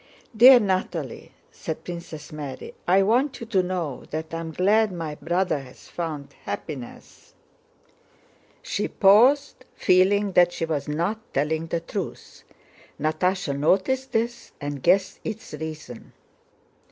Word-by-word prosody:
"Dear 250 +3 +9
Natalie," 185 - -2 0.2
said 160 - -6
Princess 170 -4 -8
Mary, 145 -3 -7
"I 190 +2 +5
want 250 +7 +1
you 230 - -6
to 210 -5 +2
know 180 -7 -3
that 160 +1 -5
I 165 - -2
am 165 -1 -5
glad 205 +5 +3
my 165 -4 -4
brother 175 +1 0
has 130 -2 -14
found 155 -5 -5
happiness...." 135 -7 -8 1.3
She - - -2
paused, 255 +8 +4
feeling 195 +2 +3
that 175 -1 +4
she 165 - -2
was 150 -3 -2
not 170 +9 -1 0.2
telling 155 +3 0
the 165 0 -2
truth. 185 +2 -6 0.6
Natásha 155 0 0
noticed 195 - +1
this 235 +1 -2
and 145 -1 -5
guessed 185 +4 +2
its 220 -4 -6
reason. 150 -5 -8
175 Hz, 130 wpm, -24 LUFS, 155-200 Hz, 1.3 s, Dear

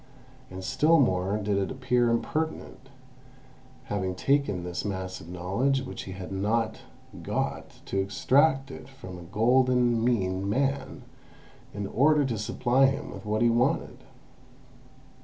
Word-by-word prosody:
And 95 0 -8
still 150 - +3
more 95 -5 +2
did 105 -1 0
it 95 - -1
appear 125 -2 +1
impertinent, 145 +2 -3 0.9
having 95 -2 -3
taken 120 -5 +1
this 90 0 -4
mass 95 -2 -4
of 80 - -12
knowledge 100 +10 0
which 130 - -7
he 95 - -7
had 95 0 -8
not 110 +3 0 0.4
got, - - -3
to 95 - -2
extract 135 +8 +2 0.2
from 95 -10 -10
it - - -10
a - - -11
golden 120 +3 +2
mean 95 -5 0
man, 135 +5 -1 0.7
in 100 0 -4
order 145 +7 +3
to 115 -5 -2
supply 125 +5 +2
him 135 - -3
with - - -9
what 110 +2 +1
he 120 - +4
wanted. 125 +1 0
115 Hz, 140 wpm, -27 LUFS, 95-135 Hz, 0.9 s, he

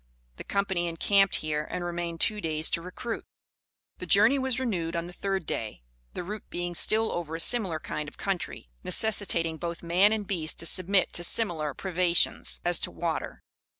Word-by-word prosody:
The - - -7
company 190 -3 -1
encamped 195 +4 +3
here, 150 -1 -2
and 175 - -4
remained 170 -1 -4
two 210 -1 +2
days 155 -2 +1
to 170 - 0
recruit. 205 +7 -6 0.8
The - - -6
journey 275 - +5
was 260 -1 0
renewed 175 -10 -2
on 170 0 -2
the 175 - -9
third 195 -2 -2
day, 110 - -5 0.3
the - - -4
route 210 +3 -7
being 175 0 -4
still 220 +5 +2
over 165 -2 -4
a - - -5
similar 190 -4 +3
kind 150 -1 -5
of - - -22
country, 180 - -4
necessitating 175 -7 +2
both 170 0 -5
man 180 +5 +4
and 215 -2 -1
beast 165 -5 -2
to - - -6
submit 185 +3 +3
to 175 - +1
similar 170 -7 +1
privations 180 -2 0
as 175 -1 +2
to - - 0
water. 170 -2 -4
175 Hz, 180 wpm, -28 LUFS, 165-200 Hz, 0.8 s, journey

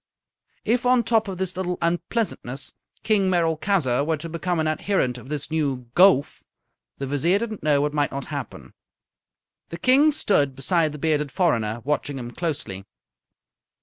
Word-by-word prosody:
If, 235 +3 +1
on 250 -1 +4
top 225 -1 +2
of 190 -2 -5
this 185 0 -2
little 180 -1 -2
unpleasantness, 170 - -2 0.3
King 200 -3 +2
Merolchazzar 160 -5 +1
were 160 +1 0
to 165 +3 -7
become 170 +1 -2
an 160 - +1
adherent 155 -5 0
of 130 - -13
this 150 0 -4
new 135 -6 -2
Gowf, 180 -5 +4 0.6
the 135 - -4
Vizier 145 +7 +1
did 230 +1 -3
not 215 - -7
know 145 -2 +2
what 150 0 -1
might 145 -2 +1
not 140 0 -5
happen. 140 -6 -7 1.0
The 170 - -6
King 265 - +5
stood 145 - +1
beside 155 +4 +1
the 150 - -7
bearded 150 -2 0
foreigner, 120 - 0
watching 145 -1 -1
him 120 -2 -6
closely. 130 - -4
160 Hz, 160 wpm, -24 LUFS, 140-190 Hz, 1.0 s, King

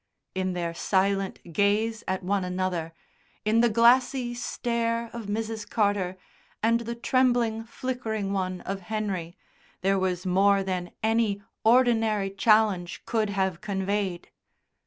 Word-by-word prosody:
In 185 0 -1
their 170 -1 -2
silent 195 -1 0
gaze 210 +4 +1
at 190 0 -2
one 195 +1 0
another, 180 -2 -2 0.5
in 220 +2 +3
the 240 - +4
glassy 240 +2 +4
stare 235 -1 -2
of 235 -3 -6
Mrs. 220 0 -3
Carter 200 -4 0 0.5
and 230 +1 +4
the 235 0 -5
trembling, 240 -2 +1
flickering 220 -5 -3
one 185 -2 -2
of 195 0 -4
Henry 190 -4 -3 0.4
there 195 +1 +2
was 185 -1 -1
more 195 +2 +3
than 180 -2 -3
any 220 -2 +1 0.2
ordinary 225 -4 +3
challenge 200 -3 +2
could 220 -2 0
have 190 -3 -1
conveyed. 195 -2 -2
205 Hz, 125 wpm, -27 LUFS, 190-230 Hz, 0.5 s, the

